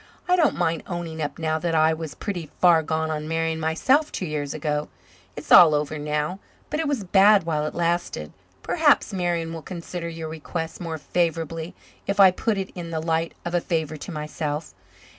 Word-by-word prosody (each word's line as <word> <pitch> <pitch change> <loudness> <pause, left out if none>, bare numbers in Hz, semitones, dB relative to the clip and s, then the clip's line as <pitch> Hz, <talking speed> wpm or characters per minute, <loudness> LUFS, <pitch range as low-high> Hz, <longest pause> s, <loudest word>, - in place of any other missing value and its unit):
"I 360 - +4
don't 320 - +3
mind 165 0 0
owning 170 -3 -5
up 145 -2 -3
now 160 -1 -1
that 165 0 -1
I 160 0 +4
was 160 -5 -6
pretty 175 -7 -5
far 175 -3 +6
gone 160 0 -1
on 155 0 -3
Marian 165 0 -1
myself 260 - +2
two 185 - -3
years 150 -3 -3
ago. 150 -2 -2 0.5
It's 145 - -9
all 160 -4 +9
over 150 +1 -2
now, 150 +5 -2 0.3
but 300 - -1
it 320 - 0
was 280 -7 -1
bad 195 +2 +5
while 155 -2 -1
it - - -6
lasted. 170 - -1 0.3
Perhaps 300 -9 +3
Marian 170 -3 -1
will 165 - -6
consider 170 0 -6
your 165 -1 -6
request 160 +1 -5
more 165 -2 -4
favourably 165 0 -2 0.3
if 200 0 -1
I 190 -2 +9
put 210 +3 -1
it 190 -1 -4
in 175 -2 -6
the 160 -1 -2
light 165 +1 -1
of 175 - -3
a 175 - +2
favour 160 -3 -2
to 180 - -8
myself. 150 0 -4
165 Hz, 195 wpm, -24 LUFS, 155-180 Hz, 0.5 s, all